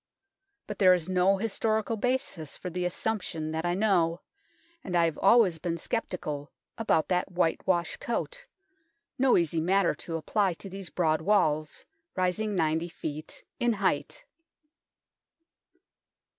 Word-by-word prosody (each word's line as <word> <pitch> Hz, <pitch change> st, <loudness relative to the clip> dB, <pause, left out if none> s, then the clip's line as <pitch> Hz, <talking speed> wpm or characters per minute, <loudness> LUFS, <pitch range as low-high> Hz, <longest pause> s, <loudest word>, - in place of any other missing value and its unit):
But -, -, -7 dB
there 185 Hz, -2 st, +7 dB
is 170 Hz, -3 st, -3 dB
no 185 Hz, +1 st, +3 dB
historical 220 Hz, +1 st, 0 dB
basis 225 Hz, -, -2 dB
for 180 Hz, -, -6 dB
the 180 Hz, +1 st, -2 dB
assumption 180 Hz, -5 st, -2 dB
that 160 Hz, +2 st, -2 dB
I 175 Hz, -, +1 dB
know, 180 Hz, -5 st, +2 dB, 0.6 s
and 180 Hz, -, -4 dB
I 170 Hz, -, +4 dB
have 160 Hz, -2 st, -2 dB
always 195 Hz, -5 st, +5 dB
been 170 Hz, +1 st, -2 dB
sceptical 155 Hz, -8 st, -4 dB, 0.2 s
about 215 Hz, -8 st, +1 dB
that 180 Hz, +1 st, 0 dB
whitewash 175 Hz, 0 st, 0 dB
coat -, -, -4 dB, 0.7 s
no 265 Hz, -1 st, +5 dB
easy 165 Hz, -1 st, +1 dB
matter 190 Hz, +2 st, +2 dB
to 165 Hz, -, -6 dB
apply 190 Hz, +4 st, +1 dB
to 195 Hz, +3 st, -10 dB
these 195 Hz, -3 st, -7 dB
broad 155 Hz, 0 st, +1 dB
walls, 155 Hz, -5 st, +1 dB, 0.3 s
rising 190 Hz, +3 st, 0 dB
90 165 Hz, 0 st, 0 dB
ft. 155 Hz, -2 st, -6 dB, 0.2 s
in 240 Hz, -1 st, +2 dB
height. 210 Hz, -, -1 dB
180 Hz, 130 wpm, -28 LUFS, 165-205 Hz, 0.7 s, there